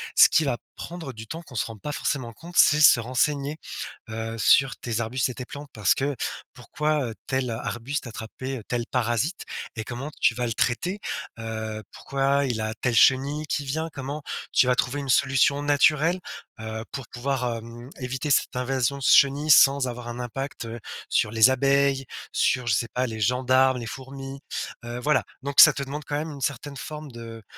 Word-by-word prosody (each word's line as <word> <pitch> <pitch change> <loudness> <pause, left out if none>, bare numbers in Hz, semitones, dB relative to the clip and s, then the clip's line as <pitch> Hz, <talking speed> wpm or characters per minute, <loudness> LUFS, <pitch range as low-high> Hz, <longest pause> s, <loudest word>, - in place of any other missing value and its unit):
ce - - +8
qui 160 - +3
va 135 -5 0 0.2
prendre 170 -5 -7
du 110 -1 -9
temps, 165 +8 -6
qu'on 145 -7 -14
se - - 0
rend 115 -1 -8
pas 150 - -5
forcément 130 -5 -2
compte, 170 +7 -12
c'est 150 0 +6
se 145 -4 +8
renseigner, 140 +5 0 0.5
heu, 115 +1 -4
sur 135 +5 +4
tes 115 -2 -3
arbustes 125 +3 -1
et - - -4
tes 125 - -6
plantes 145 +2 -9
parce 105 -3 +2
que, 140 +1 -1 0.4
pourquoi, 125 +5 -11 0.3
heu, 110 - -8
tel 130 -2 -1
arbuste 120 +5 -4
attrapait 120 +3 -6
tel 120 -1 -2
parasite 125 - -1 0.3
et 110 - -2
comment 135 +5 -6
tu - - +5
vas 125 - -1
le 115 - -2
traiter? 175 - -1 0.4
Heu, 110 -1 -5
pourquoi 140 +1 0
il 120 -4 -2
a 110 0 -2
telle 125 -2 +1
chenille 140 +6 +4
qui 145 0 -2
vient? 160 +4 -2
Comment 140 +3 -5 0.3
tu 125 - +4
vas 125 - +4
trouver 135 +2 0
une 140 - -6
solution 135 +2 +3
naturelle, 150 +4 +3 0.4
heu, 110 0 -5
pour 135 -3 -6
pouvoir, 125 -1 -2
hem, 115 +2 -10
éviter 130 +3 -3
cette - - +2
invasion 130 +1 0
de 135 - -8
chenilles 140 +4 +5
sans 135 -2 +6
avoir 120 0 -6
un 120 +1 -6
impact, 135 +1 -5
heu, 115 +1 -6 0.3
sur 105 - +2
les 110 +2 +6
abeilles, 135 +1 +2 0.3
sur, 125 -1 +1
je 110 - +3
sais 115 +2 +1
pas, 125 +1 0
les 110 -2 -6
gendarmes, 130 +3 +3
les 120 - -6
fourmis, 135 +1 -8 0.5
heu, 120 +1 -5
voilà. 135 -2 +2 0.2
Donc 140 0 -1
ça - - +9
te 140 - -3
demande 145 +3 -6
quand 145 - -2
même 155 +1 -4
une 140 -2 -9
certaine 140 +2 -3
forme 150 0 -7
de 115 -1 -9
130 Hz, 195 wpm, -25 LUFS, 120-140 Hz, 0.5 s, ça